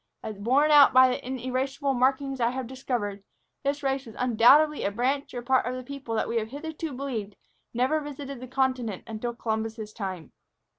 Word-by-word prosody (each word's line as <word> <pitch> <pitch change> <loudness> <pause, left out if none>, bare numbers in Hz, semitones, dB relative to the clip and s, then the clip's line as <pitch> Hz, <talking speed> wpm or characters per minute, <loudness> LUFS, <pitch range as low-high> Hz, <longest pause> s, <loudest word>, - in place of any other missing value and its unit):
As 215 -2 -6
borne 270 +8 +3
out 290 -2 +8
by 255 0 +7
the 250 - -3
inerasable 265 +2 -2
markings 265 +1 +1
I 235 - +3
have 260 +1 -4
discovered, 235 -6 -4 0.4
this 285 +1 -1
race 270 -1 -1
was 225 - -11
undoubtedly 255 +6 +5
a - - +1
branch 260 +7 -1
or 240 - -4
part 260 -1 +2
of 250 - -2
a 255 - -6
people 270 -3 -6
that 220 - 0
we 235 - -1
have 220 -1 -1
hitherto 310 +4 -6
believed 245 -7 -4 0.4
never 260 +6 +1
visited 280 -2 -7
the 255 - -8
continent 255 -6 -1
until 230 +2 -4
Columbus's 220 -1 -3
time." 190 -7 -6
255 Hz, 185 wpm, -27 LUFS, 230-275 Hz, 0.4 s, out